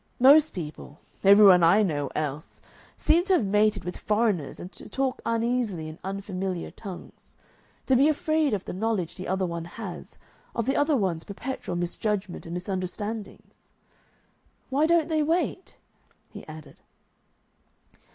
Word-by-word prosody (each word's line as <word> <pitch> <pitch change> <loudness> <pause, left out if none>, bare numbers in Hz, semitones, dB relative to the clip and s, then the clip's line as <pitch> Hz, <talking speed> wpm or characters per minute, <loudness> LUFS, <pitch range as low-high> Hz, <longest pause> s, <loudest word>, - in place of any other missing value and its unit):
Most 290 +4 +6
people, 150 -2 -7 0.2
every 200 +2 +8
one 185 -3 +8
I 175 +6 +5
know 145 -7 -1
else, 150 0 -4 0.4
seem 335 +3 +3
to 385 - +2
have 300 - +3
mated 210 -1 +2
with 180 +1 -5
foreigners 210 - 0
and 180 - -8
to - - -13
talk 270 -1 -2
uneasily 230 -7 -1
in 155 +1 -9
unfamiliar 190 -2 -4
tongues, 195 -5 -11 0.5
to 260 - +3
be 275 +4 +5
afraid 310 -3 +1
of 195 - -6
the - - -5
knowledge 195 -3 -1
the 185 - -7
other 190 +1 0
one 170 -1 -4
has, 190 +1 -8 0.4
of 230 - -1
the 270 - 0
other 290 0 +2
one's 180 -7 -1
perpetual 225 -2 -5
misjudgment 190 +2 -3
and 170 - -5
misunderstandings. 195 +3 -6 1.0
"Why 290 +4 +3
don't 335 -2 +3
they 315 -2 +1
wait?" 335 +4 -1 0.5
he - - -11
added. 155 -1 -11
200 Hz, 145 wpm, -26 LUFS, 175-255 Hz, 1.0 s, every